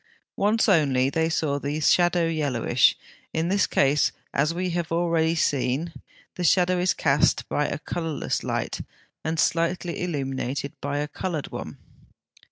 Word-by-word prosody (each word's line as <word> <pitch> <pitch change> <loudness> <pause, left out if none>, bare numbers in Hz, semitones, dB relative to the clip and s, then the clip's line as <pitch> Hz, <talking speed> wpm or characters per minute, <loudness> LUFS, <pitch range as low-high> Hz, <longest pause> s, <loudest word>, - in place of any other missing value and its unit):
Once 215 +3 +2
only 140 -8 +3
they 160 +2 +1
saw 150 -3 0
the 145 +2 -3
shadow 175 +2 +3
yellowish: 140 -7 +2 0.4
in 160 +2 0
this 200 +1 +2
case, 140 +2 +2 0.2
as 150 +3 +2
we 180 +1 -2
have 170 -1 -3
already 165 -1 +1
seen 145 +1 0
(70), 165 - -14 0.4
the 180 - -2
shadow 180 +2 +3
is 180 +1 +1
cast 145 -1 +2
by 145 - 0
a - - -3
colourless 160 0 -3
light, - - -2 0.4
and 160 0 -2
slightly 170 +1 0
illumined 135 -5 -2 0.2
by 145 0 -2
a 145 0 -1
coloured 160 -1 -4
one. - - -7
160 Hz, 150 wpm, -25 LUFS, 145-175 Hz, 0.4 s, only